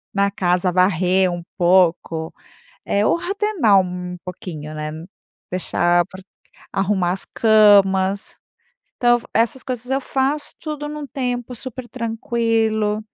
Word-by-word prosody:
na 200 0 +3
casa, 180 -1 +1
varrer 185 +1 +3
um 175 -1 -5
pouco. 170 -3 +2 0.5
Eh, 200 +1 +1
ordenar 350 - +2
um 180 -1 -5
pouquinho, 160 -4 -7
né. 155 0 -4 0.6
Deixar 175 -1 +1
pra 190 0 -12 0.5
arrumar 190 -2 +1
as 190 - -5
camas. 200 -3 +4 0.6
Então, 240 0 +4
essas 230 +3 +1
coisas 250 -1 -5
eu 270 +1 +1
faço 275 +3 -1
tudo 300 -2 -5
num 300 0 -6
tempo 250 -2 -3
super 255 +1 -8
tranquilo. 225 -2 0
205 Hz, 115 wpm, -20 LUFS, 180-245 Hz, 0.6 s, camas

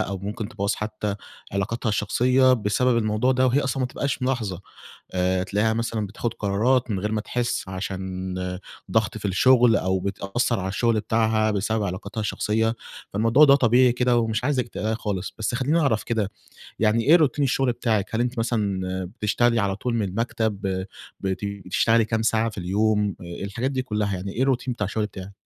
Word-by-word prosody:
أو 100 0 -2
ممكن 105 +2 -5
تبوَّظ 100 -3 -1
حتى 105 -1 -3 0.4
علاقاتها 110 +4 -2
الشخصية 125 +5 +3
بسبب 115 +2 +2
الموضوع 110 +4 +1
ده، 130 0 +3
وهي 130 +3 +3
أصلًا 135 -1 -2
ما 130 - +2
بتبقاش 135 +1 -3
ملاحظة. 115 -8 -1 0.5
آآ 90 0 +1
تلاقيها 105 +3 +1
مثلًا 115 -2 -2
بتاخد 110 +3 -4
قرارات 115 +5 +1
من 95 - -1
غير 105 +2 -2
ما 110 - 0
تحس، 120 -2 -2
عشان 95 -1 -4 0.6
ضغط 110 +1 +1
في 105 - -13
الشغل، 120 +3 +5
أو 95 0 0
بتأثر 100 +5 -1
على 95 - -3
الشغل 110 +2 +1
بتاعها 110 0 +1
بسبب 105 +1 0
علاقاتها 100 +3 -4
الشخصية، 110 +2 0 0.4
فالموضوع 115 +8 +5
ده 140 -1 +7
طبيعي 125 -1 +4
كده، 125 0 +2
ومش 115 0 -1
عايزِِك 130 -3 0
تقلقي 110 0 -2
خالص. 100 -4 -4
بس 110 +2 -1
خليني 145 +6 +1
أعرف 125 -8 +1
كده، 110 -4 -1 0.5
يعني 110 +1 +2
إيه 155 +8 +6
روتين 150 -3 +2
الشغل 130 -1 +1
بتاعِك، 110 -3 -1
هل 115 - +1
أنتِ 120 0 -2
مثلًا 105 -5 0 0.4
بتشتغلي 115 +2 +2
على 100 -2 0
طول 120 +3 -2
من 110 - 0
المكتب، 110 -1 -2 0.6
بت 95 0 -3 0.2
بتشتغلي 115 +4 +3
كام 110 0 -1
ساعة 110 0 +1
في 105 - -12
اليوم، 105 +2 +1
آآ 85 +1 -7
الحاجات 115 +7 -2
دي 130 -1 -1
كلها، 105 -5 -1
يعني 95 +2 -5
إيه 125 - -2
الروتين 130 -1 0
بتاع 105 -3 -2
الشغل 105 +2 -1
بتاعِك؟ 100 -2 -8
110 Hz, 180 wpm, -24 LUFS, 100-120 Hz, 0.6 s, ده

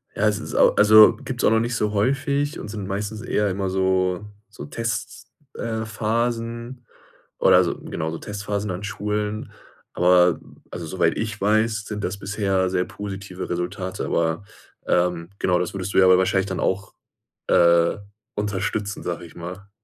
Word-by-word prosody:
Ja, 110 - +2
es 105 -1 +1
ist - - -7
au - - +6
also, 110 +2 +8
gibt's 125 0 -5
auch - - +5
noch 110 - +4
nicht 120 +1 -1
so 105 -2 0
häufig 140 +6 0
und - - -7
sind 105 -2 -6
meistens 105 +2 -4
eher 105 -1 0
immer 95 0 -2
so 95 0 +1 0.2
so 105 - -9
Tests, 115 +10 -4 0.2
äh, 110 -1 -3
Phasen 115 +2 -2 0.5
oder - - +6
so - - -2
genau, 80 +1 -4
so 80 - -5
Testphasen 105 0 -4
an 90 +3 -5
Schulen. 105 +3 -3 0.4
Aber, 90 -1 +4 0.3
also 85 -2 -6
soweit 85 -1 +1
ich 110 -2 -3
weiß, 110 +1 +2
sind 105 -1 -5
das 100 - -3
bisher 95 -2 0
sehr 90 -1 +1
positive 95 -2 -7
Resultate, 90 +2 -3
aber, 80 +3 0 0.4
ähm 90 0 +1
genau, 90 -1 +2
das 90 - -2
würdest 95 0 -4
du - - +3
ja 95 - +7
aber 95 0 +6
wahrscheinlich 95 +1 +2
dann 95 -2 -3
auch, 95 +1 -1 0.5
äh, 85 0 +4 0.4
unterstützen, 105 0 -2
sage 85 -1 -4
ich 80 - -16
mal. 90 +4 -8
100 Hz, 165 wpm, -23 LUFS, 90-110 Hz, 0.5 s, also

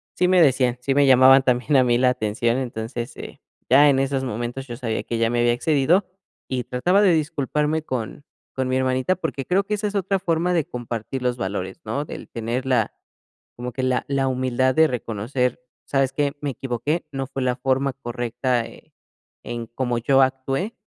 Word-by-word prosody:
sí 180 - +2
me 185 -1 +5
decían, 130 -4 +3
sí 135 +2 0
me 145 0 +5
llamaban 130 0 +7
también 125 +3 +1
a 130 - +5
mí 120 -1 +2
la 130 0 +4
atención, 115 0 0
entonces, 120 -1 -5
eh, - - -9 0.3
ya 140 +4 +7
en 135 -1 +3
esos 135 0 0
momentos 120 +2 -4
yo 120 - -6
sabía 115 -4 -3
que 115 - -3
ya 115 0 +2
me 120 0 0
había 120 0 +3
excedido, 155 +8 +2 0.4
y 125 -2 -2
trataba 180 +11 +2
de 195 -4 +5
disculparme 150 0 0
con 130 0 -5 0.3
con 130 -1 -1
mi 130 - 0
hermanita, 130 +6 +1
porque, 160 -7 -4
creo 190 +2 +2
que 210 +1 -2
esa 210 0 -2
es 205 - -6
otra 195 0 0
forma 175 -1 0
de 165 -4 +1
compartir 120 +1 -5
los 125 -1 -1
valores, 95 - -4
¿no? 145 - -2
Del - - -9
tener 120 +3 -3
la, 125 -5 +1 0.6
como 125 +1 -5
que 130 - -3
la 130 -1 +1
la 135 -1 +1
humildad 130 0 +1
de 160 0 +6
reconocer, 125 +1 -2 0.2
¿sabes 135 -1 +1
qué? 145 0 0
Me 145 - -2
equivoqué, 135 +6 -3
no 135 -1 -3
fue 135 -1 -4
la 125 -1 +1
forma 135 +1 0
correcta, 120 -1 -2
eh, - - -17 0.5
en 120 -1 -5
cómo 120 0 -2
yo 135 +3 +3
actué, 135 - -2
130 Hz, 195 wpm, -23 LUFS, 120-145 Hz, 0.6 s, llamaban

